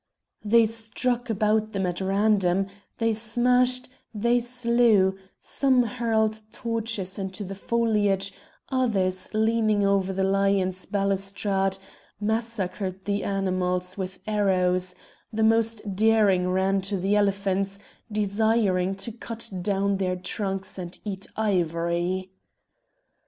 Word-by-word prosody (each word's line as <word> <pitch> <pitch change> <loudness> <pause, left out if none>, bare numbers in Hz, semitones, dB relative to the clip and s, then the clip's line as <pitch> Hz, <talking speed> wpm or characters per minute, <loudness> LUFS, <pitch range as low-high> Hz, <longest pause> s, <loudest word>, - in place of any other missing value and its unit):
They 225 +2 +5
struck 230 +2 -2
about 215 0 +1
them 195 -1 0
at 180 +1 -2
random, 195 -1 +2 0.3
they 225 -1 +1
smashed, 250 +3 +2 0.3
they 235 +3 +2
slew; 235 -5 +3 0.2
some 260 -3 +2
hurled 220 -2 0
torches 225 -5 -3
into 190 +1 -4
the 195 0 -6
foliage; 205 -2 +1 0.4
others, 195 -8 0
leaning 220 -1 +2
over 195 -1 +2
the 190 0 -1
lions' 195 -1 +1
balustrade, 195 -1 0 0.4
massacred 205 -4 -2
the 200 0 -1
animals 185 -2 -1
with 185 -1 -5
arrows; 185 -3 +1 0.4
the 220 0 0
most 220 -2 +2
daring 205 -4 +3
ran 190 +1 +1
to 195 +1 -2
the 195 +3 +1
elephants, 195 -1 +1 0.3
desiring 205 -2 +1
to 230 +4 -5
cut 230 0 -4
down 200 +1 +1
their 185 -1 0
trunks 195 +1 -3
and 175 -1 -6
eat 195 -2 -5
ivory. 175 -2 0
200 Hz, 110 wpm, -25 LUFS, 190-225 Hz, 0.4 s, They